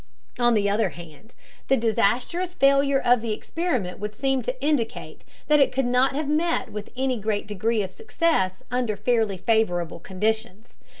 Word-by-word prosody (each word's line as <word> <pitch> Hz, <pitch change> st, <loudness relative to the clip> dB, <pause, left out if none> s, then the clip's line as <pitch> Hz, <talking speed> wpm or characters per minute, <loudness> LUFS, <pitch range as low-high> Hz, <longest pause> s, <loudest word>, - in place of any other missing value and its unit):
On 240 Hz, -1 st, +4 dB
the 205 Hz, -1 st, +2 dB
other 210 Hz, +2 st, +1 dB
hand, 170 Hz, +7 st, -13 dB, 0.3 s
the 270 Hz, -, +3 dB
disastrous 245 Hz, -, 0 dB
failure 275 Hz, 0 st, +4 dB
of 245 Hz, -3 st, +3 dB
the 225 Hz, -2 st, -2 dB
experiment 250 Hz, -, -3 dB
would 210 Hz, +1 st, -5 dB
seem 270 Hz, +2 st, 0 dB
to 250 Hz, +2 st, -4 dB
indicate 275 Hz, -5 st, -2 dB, 0.2 s
that 300 Hz, 0 st, +5 dB
it 270 Hz, -2 st, +4 dB
could 265 Hz, 0 st, 0 dB
not 250 Hz, +2 st, +2 dB
have 300 Hz, 0 st, -2 dB
met 325 Hz, +3 st, 0 dB
with 210 Hz, 0 st, -7 dB
any 260 Hz, -2 st, 0 dB
great 210 Hz, 0 st, -1 dB
degree 215 Hz, +2 st, -1 dB
of 190 Hz, -, -6 dB
success 320 Hz, -, 0 dB
under 245 Hz, -4 st, -1 dB
fairly 220 Hz, -2 st, +1 dB
favorable 180 Hz, -5 st, 0 dB
conditions. 220 Hz, +2 st, -3 dB
235 Hz, 165 wpm, -24 LUFS, 210-270 Hz, 0.3 s, that